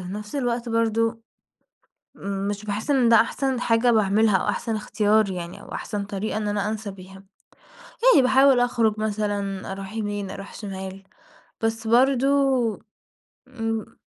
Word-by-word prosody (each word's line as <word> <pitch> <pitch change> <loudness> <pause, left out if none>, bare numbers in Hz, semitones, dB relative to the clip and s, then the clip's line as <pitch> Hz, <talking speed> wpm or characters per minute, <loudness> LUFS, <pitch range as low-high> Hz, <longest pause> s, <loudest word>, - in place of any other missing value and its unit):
نفس 210 +2 -7
الوقت 245 -3 -1
برضه 230 0 0 1.3
مش 205 +1 -4
باحس 215 +6 -3
إن 260 -4 +4
ده 230 - +7
أحسن 265 +2 -1
حاجة 235 0 +3
باعملها 215 -1 +3
أو - - -2
أحسن 225 -2 -1
اختيار 210 0 +1
يعني 180 +1 -6
أو - - -11
أحسن 205 -2 -4
طريقة 205 +2 -4
إن 210 -1 -2
أنا 205 0 -1
أنسى 215 -1 -4
بيها. 190 0 -13 0.8
يعني - - +7
باحاول 265 0 +5
أخرج 230 -3 +1
مثلًا، 205 -3 -2
أروح 195 +1 -7
يمين، 205 -3 -3
أروح 195 0 -9
شمال، 190 -2 -7 0.6
بس 225 0 -2
برضه 260 +3 +4 1.2
امم. 225 -3 -4
215 Hz, 135 wpm, -24 LUFS, 200-230 Hz, 1.3 s, ده